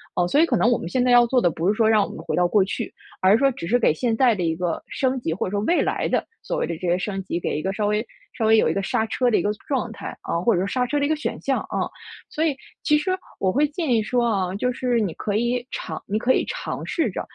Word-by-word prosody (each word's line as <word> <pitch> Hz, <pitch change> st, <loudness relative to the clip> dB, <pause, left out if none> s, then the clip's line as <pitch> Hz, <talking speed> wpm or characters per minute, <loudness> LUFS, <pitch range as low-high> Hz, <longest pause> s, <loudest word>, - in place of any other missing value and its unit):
哦， 180 Hz, -, +2 dB
所 280 Hz, -, +2 dB
以 325 Hz, -, +6 dB
可 270 Hz, -, 0 dB
能 235 Hz, -, +3 dB
我 240 Hz, -, +3 dB
们 -, -, -6 dB
现 250 Hz, +7 st, 0 dB
在 250 Hz, -, +3 dB
要 240 Hz, 0 st, +7 dB
做 250 Hz, +1 st, +2 dB
的 175 Hz, -, +3 dB
不 165 Hz, +3 st, -2 dB
是 205 Hz, -, +4 dB
说 220 Hz, -1 st, +3 dB
让 215 Hz, -1 st, +5 dB
我 -, -, -4 dB
们 -, -, -9 dB
回 -, -, -3 dB
到 180 Hz, -, +4 dB
过 200 Hz, +2 st, +3 dB
去， 195 Hz, -, -4 dB, 0.3 s
而 185 Hz, +1 st, +5 dB
是 220 Hz, -, +6 dB
说 275 Hz, +1 st, +3 dB
只 170 Hz, -, -7 dB
是 240 Hz, +7 st, +3 dB
给 230 Hz, -, +3 dB
现 230 Hz, +7 st, 0 dB
在 245 Hz, 0 st, +4 dB
的 190 Hz, -4 st, -2 dB
一 165 Hz, -1 st, 0 dB
个 175 Hz, 0 st, -2 dB
升 260 Hz, -1 st, -1 dB
级， 165 Hz, -9 st, -2 dB
或 175 Hz, -, -2 dB
者 -, -, -4 dB
说 205 Hz, -, 0 dB
未 345 Hz, -, +3 dB
来 -, -, 0 dB
的 -, -, 0 dB, 0.2 s
所 -, -, -3 dB
谓 -, -, 0 dB
的 170 Hz, -, -3 dB
这 180 Hz, +2 st, -4 dB
些 175 Hz, -, +2 dB
升 195 Hz, +1 st, -3 dB
级， 175 Hz, -, -3 dB
给 170 Hz, -, -2 dB
一 155 Hz, -, -2 dB
个 190 Hz, +3 st, -2 dB
稍 210 Hz, 0 st, -1 dB
微 210 Hz, +2 st, 0 dB, 0.3 s
稍 225 Hz, -, -2 dB
微 220 Hz, 0 st, +6 dB
有 -, -, +3 dB
一 -, -, +1 dB
个 195 Hz, -, -1 dB
刹 220 Hz, +3 st, 0 dB
车 250 Hz, +3 st, +1 dB
的 230 Hz, -, +2 dB
一 -, -, +1 dB
个 205 Hz, -, 0 dB, 0.2 s
状 260 Hz, -5 st, -1 dB
态， 225 Hz, -, -8 dB
啊， 170 Hz, -, -2 dB
或 225 Hz, +7 st, +2 dB
者 180 Hz, -, +1 dB
说 195 Hz, -, -1 dB
刹 250 Hz, +4 st, 0 dB
车 295 Hz, -, -1 dB
的 -, -, +2 dB
一 -, -, -1 dB
个 315 Hz, -, +2 dB
选 -, -, -3 dB
项， -, -, 0 dB
啊。 -, -, -1 dB, 0.5 s
所 315 Hz, -, -1 dB
以， 300 Hz, -4 st, +1 dB, 0.3 s
其 300 Hz, -, +4 dB
实 365 Hz, +5 st, -1 dB, 0.3 s
我 190 Hz, -, +2 dB
会 290 Hz, +8 st, +2 dB
建 305 Hz, +1 st, -3 dB
议 230 Hz, -2 st, +4 dB
说 240 Hz, +3 st, 0 dB
啊， 190 Hz, -5 st, 0 dB
就 250 Hz, +5 st, 0 dB
是 245 Hz, -1 st, 0 dB
你 195 Hz, -6 st, -1 dB
可 205 Hz, -, -3 dB
以 240 Hz, +2 st, 0 dB
尝 -, -, -5 dB
你 205 Hz, -, 0 dB
可 240 Hz, +4 st, +2 dB
以 -, -, +1 dB
尝 -, -, -5 dB
试 330 Hz, -, 0 dB
着， -, -, -4 dB
220 Hz, 340 characters per minute, -23 LUFS, 190-250 Hz, 0.5 s, 要